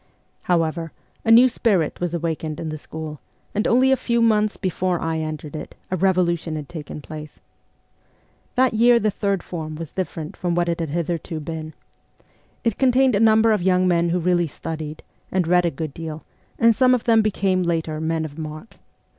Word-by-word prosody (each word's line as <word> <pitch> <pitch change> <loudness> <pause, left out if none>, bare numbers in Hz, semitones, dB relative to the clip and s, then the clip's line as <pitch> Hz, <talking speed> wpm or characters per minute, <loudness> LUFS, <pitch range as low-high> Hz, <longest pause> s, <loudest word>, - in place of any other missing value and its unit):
However, 165 -2 0 0.3
a - - -1
new 235 +3 +8
spirit 200 -10 +1
was 175 -1 -2
awakened 160 -2 -3
in 160 - -4
the 155 0 -5
school, 155 -1 -7 0.3
and 210 - 0
only 260 +3 +4
a - - +6
few 235 -2 0
months 215 -2 +2
before 185 -1 -1
I 160 0 -1
entered 155 -1 -5
it 155 - -7 0.2
a - - +1
revolution 175 -3 +1
had 150 -2 -5
taken 150 -3 -8
place. 150 +1 -9 1.2
That 255 -2 +3
year 235 +2 +5
the 215 -1 +1
third 200 -2 -1
form 155 -3 -6
was 160 -1 -7
differ 185 -3 -4
ent 155 +6 -7
from 175 -1 -1
what 175 0 +1
it 170 - -1
had 165 -2 -2
hitherto 170 +1 -3
been. 155 0 -6 0.9
It 230 - 0
contained 260 -1 +4
a 200 - +2
number 220 0 +5
of 210 -3 +2
young 185 0 +3
men 170 -1 +2
who 175 - +1
really 175 -1 +2
studied, 155 0 -6 0.3
and 185 -2 +1
read 180 0 +4
a - - +2
good 155 -1 -5
deal; 160 -1 -7 0.5
some 255 +2 +4
of 245 - -3
them 225 -2 +4
became, 195 -3 +1
later, 165 -3 -1
men 160 0 -1
of 150 0 -9
mark. 155 +6 -8
175 Hz, 190 wpm, -22 LUFS, 160-210 Hz, 1.2 s, new